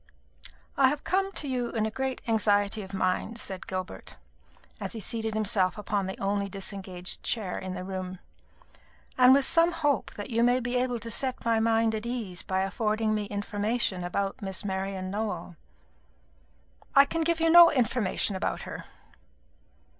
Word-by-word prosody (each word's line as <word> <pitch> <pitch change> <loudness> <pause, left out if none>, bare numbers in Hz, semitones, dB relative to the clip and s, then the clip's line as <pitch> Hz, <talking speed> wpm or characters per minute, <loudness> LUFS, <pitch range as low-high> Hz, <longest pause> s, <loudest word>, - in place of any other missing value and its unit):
"I 270 - +6
have 290 +2 -1
come 390 +1 0
to 295 - -3
you 250 -2 -1
in 220 -1 0
great 265 +2 -3
anxiety 210 -1 +2
of 190 -1 -9
mind," 190 +4 -1
said 190 -3 -5
Gilbert, 185 0 -6 0.6
as - - -5
he 225 - -5
seated 220 0 -2
himself 205 -3 +1
upon 205 -2 -1
the 190 - -5
only 200 0 -1
disengaged 190 -2 -5
chair 205 -6 -2
in 185 -1 -5
the 180 - -5
room, 185 -1 -5 1.0
"and 250 0 +7
with 270 0 +5
some 335 +3 +4
hope 290 -6 0
that 205 +4 -6
you 230 0 +2
may 245 +1 +4
be 245 0 -3
able 245 -1 0
to 230 +1 -5
set 255 +1 -2
my 230 -1 +3
mind 225 0 +2
at 220 +1 -3
ease 220 -8 -4
by 190 0 -1
affording 215 +2 0
me 210 -1 -1
information 205 -1 -1
about 195 +4 -2
Miss 195 0 -3
Marian 190 -1 -3
Nowell." 200 -5 -3 1.4
"I 275 - +9
can 330 +4 -2
give 335 0 +1
you 325 0 +3
no 345 0 +10
information 230 -6 0
about 190 - -2
her." - - -7
215 Hz, 165 wpm, -28 LUFS, 195-245 Hz, 1.4 s, no